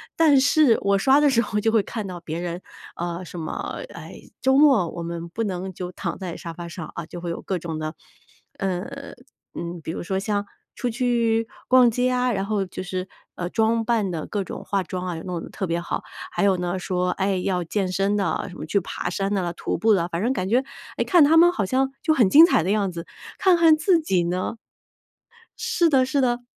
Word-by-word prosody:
但 305 -4 +5
是 280 -3 +4
我 200 0 +2
刷 265 +8 +4
的 295 -1 +4
时 240 -4 +3
候 210 -1 -2
就 225 +2 +1
会 220 -2 +3
看 210 +1 -5
到 180 -2 -6
别 165 0 -5
人， 175 0 -4 0.3
呃， 175 +1 -4
什 175 - -8
么， 155 - -5
哎， - - -10 0.2
周 265 +1 +4
末 270 - +5
我 170 - -6
们 170 0 -5
不 225 +7 -3
能 190 -2 -3
就 180 0 -6
躺 175 -2 -4
在 180 -3 -5
沙 170 - -7
发 170 +1 -7
上， 170 -2 -7
啊， 170 - -5
就 175 - -8
会 175 - -4
有 170 - -4
各 190 -2 -2
种 165 -1 -5
的 155 0 -4 0.6
呃， 210 +10 -4 0.4
嗯， 170 0 -5
比 160 - -4
如 - - -5
说 190 +2 -2
像 205 0 -1 0.3
出 250 - -2
去 230 -2 +1 0.2
逛 255 -2 +6
街 250 +2 +1
啊， 250 0 +1
然 195 -3 -1
后 205 -2 -1
就 185 - -7
是， 185 0 -4 0.3
呃， 175 - -3
装 225 +2 +1
扮 225 -4 +1
得 160 -3 -4
各 205 -2 -2
种 - - -7
化 200 -1 0
妆 180 0 -5
啊， 175 - -3
弄 180 -1 -4
得 - - -8
特 190 - -4
别 170 +1 0
好， - - -4 0.3
还 - - -1
有 195 -2 +3
呢 180 +1 -2
说， 180 0 -1
哎， 195 0 0
要 180 -1 -1
健 185 +2 -2
身 195 +2 +1
的， 190 -6 -1
什 180 - -11
么 - - -6
去 200 - +1
爬 - - -5
山 195 +3 -2
的， 180 -4 -1
徒 - - -3
步 220 0 +4
的， 170 -4 +1
反 170 0 -3
正 250 +3 +1
感 185 -6 -2
觉， 245 +4 +3 0.3
诶， - - +2
看 350 -4 +5
他 310 +3 +5
们 345 +1 +7
好 220 - -1
像 265 +6 +1
就 320 - +2
很 245 -9 +4
精 305 +10 +9
彩 255 - +2
的 185 - 0
样 205 -3 +1
子， 170 -1 -7 0.3
看 375 -2 +4
看 325 -2 +5
自 340 +2 +3
己 190 - +1
呢 180 +5 -2 1.0
是 450 -7 +2
的 265 -4 +4
是 265 +2 0
的。 245 -1 0
195 Hz, 245 characters per minute, -23 LUFS, 175-250 Hz, 1.0 s, 精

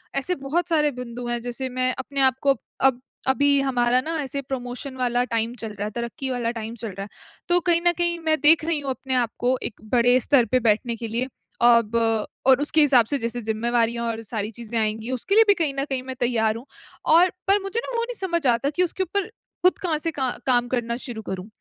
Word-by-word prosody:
ऐसे 275 +7 0
बहुत 345 +6 0
सारे 300 -3 +2
बिंदु 240 0 -7
हैं। 240 0 -1
जैसे 245 +2 -4
मैं 255 0 +2
अपने 275 +1 -3
आपको 270 +2 +1 0.3
अब 255 -2 +3 0.3
अभी 280 +1 +3
हमारा 250 -2 +2
ना 325 +5 -4
ऐसे 280 0 -4
प्रमोशन 260 0 -6
वाला 245 -1 +1
टाइम 230 +1 0
चल 225 -3 -7
रहा 205 0 -4
है, 210 - -4
तरक्की 235 +4 -4
वाला 245 -2 -1
टाइम 225 -1 -6
चल 225 -1 -6
रहा 195 +1 -7
है, 200 - -10 0.4
तो 350 0 +6
कहीं 340 -1 +2
न - - +7
कहीं 345 0 +1
मैं 315 -1 +2
देख 310 +1 +6
रही 325 -2 0
हूँ 280 -1 -5
अपने 260 0 -4
आपको, 245 +1 0
एक 215 - -6
बड़े 245 +1 +4
स्तर 255 -1 +4
पे 255 - +4
बैठने 230 +3 0
के 230 0 -6
लिए। 235 +4 -1 0.4
अब 235 -2 +4 0.5
और 265 +1 +6
उसके 300 +2 +4
हिसाब 260 -6 +5
से 285 - 0
जैसे 235 +1 -2
ज़िम्मेवारियाँ 235 +1 0
और 225 0 -4
सारी 215 -1 -3
चीज़ें 230 +1 -5
आएँगी, 220 +2 -1
उसके 260 - -1
लिए 450 - +8
भी 405 - +7
कहीं 320 -6 0
न - - +1
कहीं 260 -2 -1
मैं 260 0 -6
तैयार 225 -3 +1
हूँ 235 - -11 0.4
और 345 +3 +6 0.2
पर 395 +1 +4
मुझे 390 +4 -2
ना, - - -6
वो 465 - +1
नहीं - - -5
समझ 340 -5 -1
आता 240 +3 +2
कि 330 +5 +1
उसके 360 +2 -1
ऊपर 390 +2 -2 0.4
खुद 365 - +5
कहाँ 330 -4 0
से 330 +2 -2
का 265 -4 -1 0.2
काम 245 -2 +3
करना 240 -2 -2
शुरू 235 -4 -6
करूँ? 190 0 -5
255 Hz, 230 wpm, -23 LUFS, 235-295 Hz, 0.5 s, लिए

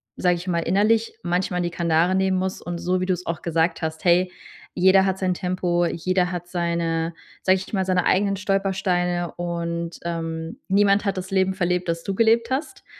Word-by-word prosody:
sage 180 -1 +2
ich 175 +2 -8
mal, 170 -2 +1
innerlich 215 +6 +2
manchmal 180 0 0
die 175 -1 -2
Kandare 170 +2 +2
nehmen 190 -1 +2
muss 185 0 -2
und 175 -1 -5
so 180 +1 -1
wie - - 0
du 185 - 0
es 180 0 -6
auch 165 -1 -3
gesagt 165 +1 0
hast: 160 +2 -4
„Hey, 180 +1 +4 0.4
jeder 190 +1 +5
hat 190 0 0
sein 185 -1 0
Tempo, 180 -1 0
jeder 180 +2 0
hat 175 -1 -5
seine 170 -2 -1 0.3
sage 185 0 +4
ich 190 +3 -9
mal, 190 -1 +1
seine 185 -1 +1
eigenen 195 +1 +2
Stolpersteine 185 -3 0
und, 170 -1 -3
ähm, 165 -1 -4
niemand 200 +1 +4
hat 200 -2 -1
das 185 +1 -5
Leben 190 0 +2
verlebt, 180 -1 -1
das 165 0 -2
du 195 - -2
gelebt 230 +1 +3
hast.“ 270 +4 -3
180 Hz, 195 wpm, -23 LUFS, 170-190 Hz, 0.4 s, jeder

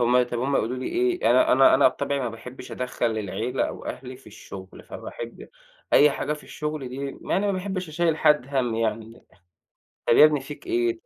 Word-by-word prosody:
هم 125 +1 +4
طَب 120 -1 -3
هم 135 +3 +1
يقولوا 120 +4 -1
لي 130 - -4
إيه، 365 +1 +1
أنا - - +5
أنا - - +6
أنا - - +6
بطبعي 140 -1 -2
ما 125 - -1
باحبّش 125 +3 -10
أدخَّل 120 -3 -2
العيلة 110 +5 -2
أو - - -8
أهلي 125 0 -7
في 135 - -21
الشُغل، 95 -3 -11
فباحب 115 0 -8 0.4
أي 150 0 +7
حاجة 150 - -2
في 150 - -8
الشُغل 150 -3 -5
دي 125 - -8
يعني 140 +8 -2
ما 200 - +1
باحبّش 185 -1 -3
أشيّل 160 0 +1
حد 150 -5 +3
هَم 130 -5 0
يعني، 115 0 -3 0.8
"طَب - - +5
يا 150 - +9
ابني 150 -2 +4
فيك 145 - -10
إيه؟" 355 -1 0
135 Hz, 195 wpm, -25 LUFS, 120-155 Hz, 0.8 s, يا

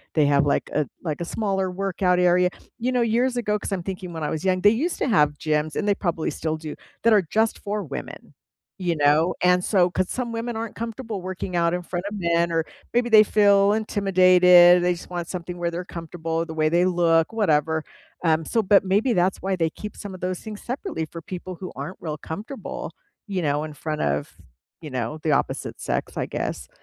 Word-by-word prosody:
they 155 -2 +4
have, 145 0 +3
like, - - 0
a 150 -2 +1 0.2
like, 155 -2 -3
a - - -2
smaller 195 -1 -1
workout 185 -1 0
area. 180 0 +4 0.3
You 250 +2 -1
know, 250 - +2
years 240 +2 +1
ago, 210 -3 0
'cause - - -6
I'm 190 -3 -2
thinking 185 -1 -6
when 160 -2 -5
I - - -1
was 160 - -3
young, 185 -1 +1
they 205 - +6
used 300 +11 -1
to - - 0
have 150 - +3
gyms, 155 -1 -1
and 210 - -1
they 205 - +4
probably 170 -5 -2
still 160 -1 -3
do, 155 -1 -7 0.3
that 230 - +5
are 210 - +6
just 220 +6 0
for 205 0 -3
women, 145 -5 -8 0.4
you 175 -2 -1
know? 150 +4 +3
And 180 0 +4
so 180 -3 +3
'cause 185 +1 -1
some 245 -2 -3
women 230 +1 -3
aren't 225 0 -5
comfortable 230 -2 -5
working 185 0 -5
out 170 0 +2
in 180 - -1
front 175 +1 -5
of 210 - -6
men 170 -2 +1
or 165 -1 0 0.3
maybe 240 0 +2
they 215 -2 +8
feel 200 -1 +4
intimidated, 185 -4 +6
they 180 0 +3
just 170 - -10
want 175 -2 -4
something 180 -1 -6
where 175 -1 -1
they're 175 +1 -5
comfortable, 165 -1 -4
the 160 - -7
way 155 -1 +1
they 175 +2 +3
look, 170 0 +2
whatever. 160 -7 +1 0.4
Um, 160 -1 +2
so 225 +6 +1
but 200 +1 +5
maybe 210 +6 +2
that's 185 -1 +1
why 190 0 -1
they 165 -3 0
keep 210 +5 -8
some 200 -2 -7
of 185 - -10
those 180 0 -2
things 215 -2 -8
separately 255 - -4
for 165 +2 -9
people 185 +2 -7
who 185 +1 -8
aren't 185 - -6
real 155 -2 -4
comfortable, 210 - -7 0.4
you 195 -3 -2
know, 145 -1 0
in 155 - -8
front 155 +1 -4
of, 70 0 -1 0.5
you 155 - -7
know, 125 +2 -3
the 155 - +1
opposite - - -2
sex, - - -3
I - - 0
guess. - - -4
180 Hz, 220 wpm, -24 LUFS, 165-205 Hz, 0.5 s, they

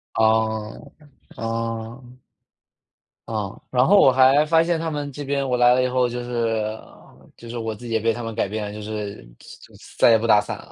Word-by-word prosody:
哦， 110 -1 0 0.5
哦。 115 +1 -4 1.3
啊， 105 -3 -4
然 125 0 +2
后 205 - +6
我 135 - +6
还 135 +3 +5
发 165 +1 +3
现 170 -1 0
他 165 0 -3
们 145 -2 -4
这 145 +2 -7
边 140 0 -2
我 125 - 0
来 120 0 +5
了 130 0 +2
以 - - +1
后 125 -1 +1
就 120 +1 -5
是 115 -3 -2 0.6
就 115 - -12
是 120 - -6
我 115 -1 -3
自 120 - -12
己 115 - -7
也 110 - +1
被 115 +1 +1
他 120 +1 -6
们 115 0 -5
改 110 - 0
变 105 +1 -4
了， 105 - -7
就 105 - -8
是 105 -1 -5 0.2
再 - - -15 0.4
再 - - +6
也 115 - +6
不 110 - -4
打 105 -2 +5
伞 - - -6
了。 - - -15
115 Hz, 230 characters per minute, -22 LUFS, 110-130 Hz, 1.3 s, 后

